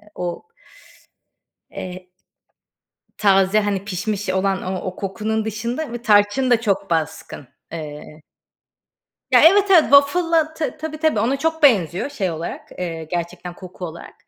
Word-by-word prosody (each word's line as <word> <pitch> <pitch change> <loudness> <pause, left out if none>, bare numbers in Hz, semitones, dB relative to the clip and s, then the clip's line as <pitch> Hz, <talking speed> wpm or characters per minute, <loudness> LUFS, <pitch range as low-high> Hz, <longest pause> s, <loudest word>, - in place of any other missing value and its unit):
o 175 - -4 1.3
Eee 185 0 -8 1.1
Taze 195 0 +3
hani 200 -2 -2
pişmiş 200 +1 -3
olan 190 +1 0
o 185 0 -3
o 185 - -4
kokunun 215 +3 -3
dışında 235 +6 -4
ve 240 - -5
tarçın 215 +3 +3
da 230 - +4
çok 200 -4 -1
baskın. 160 -4 -3 0.2
Eee 150 -1 -8 1.1
Ya, - - +7
evet 390 +4 +6
evet 335 -4 +8
waffle'la 315 +3 +3
t 310 -5 -4
tabii 310 0 -6
tabii 310 -8 +1
ona 250 +6 +1
çok 320 +1 -2
benziyor 195 - +3
şey 195 -11 -2
olarak, 165 +1 -6
eee, 165 -3 -4
gerçekten 175 +2 -5
koku 180 0 -9
olarak. 170 +1 -10
205 Hz, 135 wpm, -21 LUFS, 180-275 Hz, 1.3 s, evet